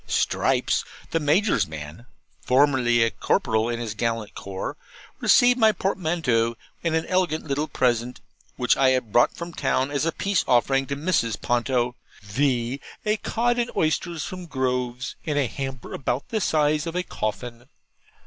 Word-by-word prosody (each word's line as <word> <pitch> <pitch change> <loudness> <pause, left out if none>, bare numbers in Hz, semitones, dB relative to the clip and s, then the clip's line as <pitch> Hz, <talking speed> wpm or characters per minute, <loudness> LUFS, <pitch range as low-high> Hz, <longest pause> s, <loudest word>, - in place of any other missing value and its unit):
Stripes, - - +1 0.3
the 165 - +1
Major's 150 - +2
man 80 - -9 0.3
(formerly 125 -4 +3
corporal 110 +1 +1
in 120 -1 -2
his 115 -3 -4
gallant 115 -1 -2
corps), 95 -1 -5 0.4
received 245 +1 +5
my 220 -1 +6
portmanteau, 160 - 0 0.3
and 165 -1 +1
an 160 - 0
elegant 180 -4 0
little 145 +1 -1
present, 120 -2 0 0.4
which 125 -1 +2
I 135 -1 +4
had 130 -4 0
brought 120 - +4
from 170 0 -7
town 135 -1 0
as 145 0 0
a - - +2
peace 195 +2 0
offering 135 +2 +3
to 140 - -2
Mrs. 140 - 0
Ponto; 120 0 0 0.3
viz., 125 +3 0 0.3
a 210 +1 +2
cod 240 +3 0
and 240 0 0
oysters 160 +1 0
from 180 -1 -7
Grove's, 125 -3 -2
in 150 -2 -2
a 145 - +3
hamper 135 +1 -6
about 130 0 -2
the 220 -2 -1
size 150 -1 +1
of 165 - -4
a 180 - 0
coffin. 120 -3 -5
135 Hz, 155 wpm, -24 LUFS, 120-165 Hz, 0.4 s, my